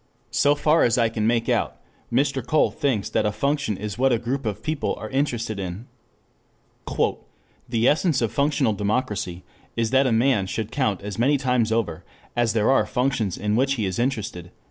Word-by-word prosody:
So 145 +1 +3
far 155 +2 +3
as 120 - +3
I 115 -2 +3
can 110 -1 -1
make 115 0 +1
out, - - 0 0.3
Mr. 135 +1 +1
Cole 155 +6 +2
thinks 130 -10 -1
that - - +1
a - - 0
function 140 -3 -1
is 105 +1 -5
what 135 +1 +4
a 120 - +3
group 125 +2 -3
of 105 0 -4
people 155 -2 -1
are - - -8
interested 120 -6 -1
in. 95 +4 -5 1.8
"The 115 0 +2
essence 160 0 +3
of 115 -3 0
functional 140 -2 +1
democracy 105 -4 -2 0.3
is 115 -1 0
that 135 0 +4
a - - +1
man 115 -4 +2
should 110 +2 -4
count 105 -9 -1
as 105 0 -5
many 140 +5 +3
times 125 -4 +1
over 110 -8 -1 0.3
as 120 -2 +2
there 110 +2 +3
are 135 - +3
functions 125 -7 0
in 105 +1 0
which 135 +3 +2
he 110 -5 -1
is 95 +1 -2
interested." 110 -9 -2
115 Hz, 190 wpm, -24 LUFS, 105-135 Hz, 1.8 s, what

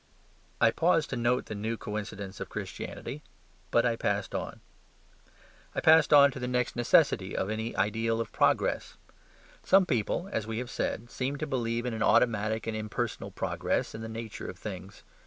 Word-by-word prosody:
I - - +5
paused 165 -2 +2
to - - -1
note 120 +1 +1
the - - -6
new 110 +2 -3
coincidence 105 -3 -6
of - - -5
Christianity: 150 - -6 0.5
but 120 - +3
I 120 -1 +2
passed 100 -2 -1
on. - - -4 1.2
I - - +1
passed 160 0 +6
on 140 -1 +8
to 130 - -7
the 125 - -3
next 125 -1 0
necessity 120 -1 +3
of 95 - -1
any 110 +2 -3
ideal 115 +2 0
of 115 - -3
progress. - - +1 0.7
Some 195 -1 +5
people 125 - -1
(as 110 -1 -2
we 110 0 -3
have 125 0 -4
said) 120 +2 -3
seem 135 +2 -2
to 155 - -3
believe 120 -4 -1
in 125 - -2
an 110 - -4
automatic 110 -1 +2
and 115 - -2
impersonal 110 +2 -3
progress - - -2
in 110 - -7
the 115 - -6
nature 110 -1 -6
of 90 - -8
things. 95 0 -8
115 Hz, 175 wpm, -29 LUFS, 110-125 Hz, 1.2 s, on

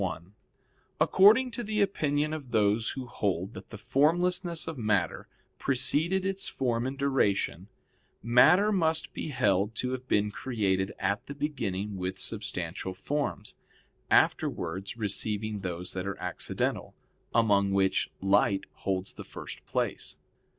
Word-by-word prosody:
1: 90 0 -4 0.7
According 225 +7 +6
to 240 - -4
the 215 0 -2
opinion 155 -6 +1
of 145 -5 -6
those 110 0 +2
who 130 - -4
hold 100 -4 -2
that - - -10
the 110 - -8
formlessness 170 - +1
of 160 - -4
matter 105 - 0 0.3
preceded 160 +8 +1
its 195 0 -1
form 120 -2 -1
in 135 - -4
duration, 100 - 0 0.6
matter 155 - +6
must 160 -5 +1
be - - -4
held 105 -6 +1
to 125 +2 -2
have 130 0 -5
been 105 0 +2
created 100 -6 -1
at 100 +2 -1
the 140 - -6
beginning 105 -9 -3
with 95 +1 -3
substantial 95 -4 -4
forms, 145 +9 -3 0.6
afterwards 95 +6 +1
receiving 105 0 -2
those 90 -1 -5
that 95 0 -3
are 100 - -3
accidental, - - -2 0.4
among 100 -4 +4
which 95 -1 +2
light 100 0 +3
holds 95 0 -3
the - - -9
first - - -9
place. - - -2
110 Hz, 135 wpm, -29 LUFS, 95-150 Hz, 0.7 s, According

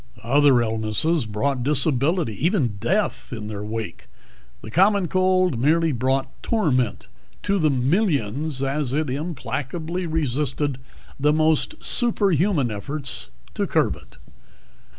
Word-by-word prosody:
Other 140 0 +4
illnesses 110 +6 0
brought 125 +5 -1
disability, 145 - +2
even 150 - +1
death 195 - -1
in 110 -4 -5
their 105 -1 -5
wake; 110 0 -6 0.6
the 110 - -8
common 190 - +3
cold 185 -6 +2
merely 160 +5 +3
brought 130 +1 -1
torment 130 - 0 0.4
to 200 -1 +1
the 155 -2 +3
millions 140 - 0
as 135 -1 -1
it 150 -2 0
implacably 160 +3 -4
resisted 145 -3 -1 0.4
the 150 +2 +3
most 155 - +1
superhuman 195 - +2
of 105 - -4
efforts 135 - -5 0.2
to - - -1
curb - - +1
it. - - -16
145 Hz, 120 wpm, -23 LUFS, 125-170 Hz, 0.6 s, Other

